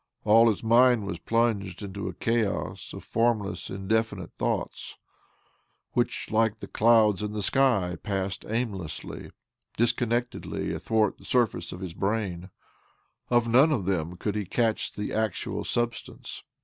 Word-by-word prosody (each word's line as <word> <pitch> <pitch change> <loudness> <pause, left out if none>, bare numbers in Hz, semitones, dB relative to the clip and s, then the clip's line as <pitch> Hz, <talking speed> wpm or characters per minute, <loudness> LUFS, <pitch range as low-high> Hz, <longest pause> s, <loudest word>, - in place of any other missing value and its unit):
All 115 +2 +6
his 110 - -2
mind 120 -1 +5
was 100 -4 -4
plunged 105 -2 0
in 100 -1 -7
a 100 - -4
chaos 115 -3 -1
of - - -8
formless, 115 -3 0
indefinite 100 -1 -1
thoughts - - -3 0.9
which, - - -1
like 110 0 +2
the - - -7
clouds 110 -3 +4
in 105 0 -3
the 105 -1 -2
sky, 100 -8 +2
passed 95 -1 -3
aimlessly, 105 -7 -4 0.5
dis 120 +1 +4
connectedly 120 +1 -2
athwart 110 -2 0
the - - -16
surface 110 -9 +1
of 90 - -8
his 90 -3 -5
brain. 95 -3 -2 0.8
Of 120 -1 +3
none 130 +7 +5
of 115 -11 0
them 90 -2 -1
could 105 +3 -2
he 105 0 -1
catch 115 +3 0
the 105 - -4
actual 110 -3 -1
substance. 120 -1 -3
110 Hz, 140 wpm, -27 LUFS, 95-115 Hz, 0.9 s, All